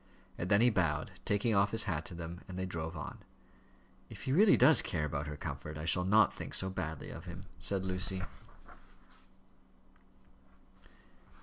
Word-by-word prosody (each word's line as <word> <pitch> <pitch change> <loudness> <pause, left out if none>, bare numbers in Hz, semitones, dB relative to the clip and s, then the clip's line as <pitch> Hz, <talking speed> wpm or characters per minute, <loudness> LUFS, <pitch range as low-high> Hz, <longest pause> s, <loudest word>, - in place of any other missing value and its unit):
And 90 - -4
then 100 +1 +5
he 120 +1 +5
bowed, 80 -7 0
taking 105 +3 +1
off 100 +1 +4
his 115 +1 +3
hat 80 -7 -2
to 90 - -9
them, 85 +1 -7
and 95 - -7
they 95 - -2
drove 80 -3 -5
on. - - -7 0.9
"If - - -10
he 130 - -2
really 200 +5 +6
does 145 +5 +6
care 80 -3 -2
about 75 0 -3
her 75 0 -6
comfort, 75 +2 -6
I 75 - -5
shall 90 +2 +4
not 105 +1 +5
think - - -6
so 95 0 0
badly 80 -4 -5
of 80 - -9
him," 90 +2 -8
said 95 -1 0
Lucy. 95 0 -1
90 Hz, 170 wpm, -33 LUFS, 80-100 Hz, 0.9 s, really